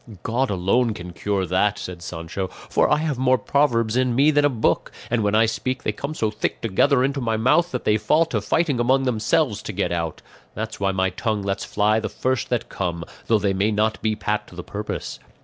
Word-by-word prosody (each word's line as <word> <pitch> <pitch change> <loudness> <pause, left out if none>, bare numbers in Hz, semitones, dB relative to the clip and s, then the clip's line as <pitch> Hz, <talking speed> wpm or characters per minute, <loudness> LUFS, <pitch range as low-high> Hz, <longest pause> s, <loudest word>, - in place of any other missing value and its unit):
"God 125 +4 0
alone 105 +5 +1
can 90 -2 -8
cure 100 +1 -1
that," 95 +4 +1
said 90 -3 -7
Sancho; 85 +3 -5
"for - - -1
I 150 - +4
have 150 -4 -2
more 130 0 +4
proverbs 120 -6 +1
in 125 -1 +2
me 140 +4 +5
than 145 -1 +3
a 145 - +5
book, 120 -5 0 0.2
and 120 -2 +2
when 105 0 +1
I 110 +1 +5
speak 130 +3 -2
they - - 0
come 140 +8 -5
so 110 -6 0
thick 105 - -2
together 125 +5 +2
into 135 +1 0
my 115 -2 0
mouth 165 +10 +3
that - - -3
they 105 - +3
fall 155 +9 +3
to 115 -10 -2
fighting 140 - +1
among 130 +3 +3
themselves 120 0 +1
to - - -5
get - - -1
out; 85 -2 -3 0.3
that's - - -5
why 100 -1 +1
my 95 0 0
tongue 105 +2 -2
lets 100 0 -2
fly 105 +1 +2
the 110 - -3
first 130 -3 -1
that 120 -2 -1
come, 85 -3 -3 0.2
though 115 - +4
they 100 -1 0
may 100 +3 +1
not 110 +1 0
be 110 -1 0
pat 105 0 -2
to - - -14
the 90 - -6
purpose. 105 +1 -5
110 Hz, 225 wpm, -23 LUFS, 100-130 Hz, 0.3 s, me